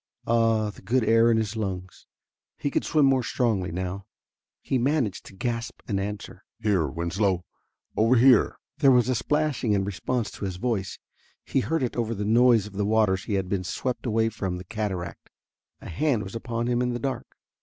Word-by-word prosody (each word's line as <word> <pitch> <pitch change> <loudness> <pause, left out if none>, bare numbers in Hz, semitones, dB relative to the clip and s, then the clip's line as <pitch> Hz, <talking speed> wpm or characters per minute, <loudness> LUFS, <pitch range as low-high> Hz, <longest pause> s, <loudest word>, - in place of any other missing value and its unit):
Ah, 115 -2 +2
the - - -16
good 120 +6 +1
air 115 +1 +5
in 115 - +4
his 110 -1 -1
lungs 95 -4 -5 0.5
he 145 - -2
could - - 0
swim 150 -3 +3
more 135 -1 +4
strongly 110 -8 0
now. 95 +2 -4 0.6
He 130 - 0
managed 130 -5 0
to 95 - -13
gasp 115 +1 -3
an 100 -3 0
answer: 100 +1 -6 0.2
"Here, 100 -7 +1
Winslow, 90 +2 -1 0.5
over 115 +4 +4
here!" 125 -1 +5 0.2
There 140 -2 +6
was 125 -2 +4
a - - +3
splashing 145 -2 0
in 100 -1 +2
response 110 +4 -2
to - - -6
his 95 -2 -3
voice. 100 -2 -2 0.5
He - - +1
heard 160 +3 0
it 125 - -2
over 115 -1 -1
the 105 0 -3
noise 115 -1 +5
of 105 - -10
the 100 +1 -1
waters 105 -3 +2
he 105 - -1
had 95 -1 -1
been 95 -1 -1
swept 125 +7 -3
away 115 0 +2
from 95 -4 -3
the 90 - -7
cataract. 95 -4 -4 0.5
A - - -9
hand 120 - 0
was 95 - -8
upon 115 0 -3
him 120 0 +1
in 125 -1 0
the 120 - -3
dark. 135 +2 -4
110 Hz, 195 wpm, -26 LUFS, 95-125 Hz, 0.6 s, There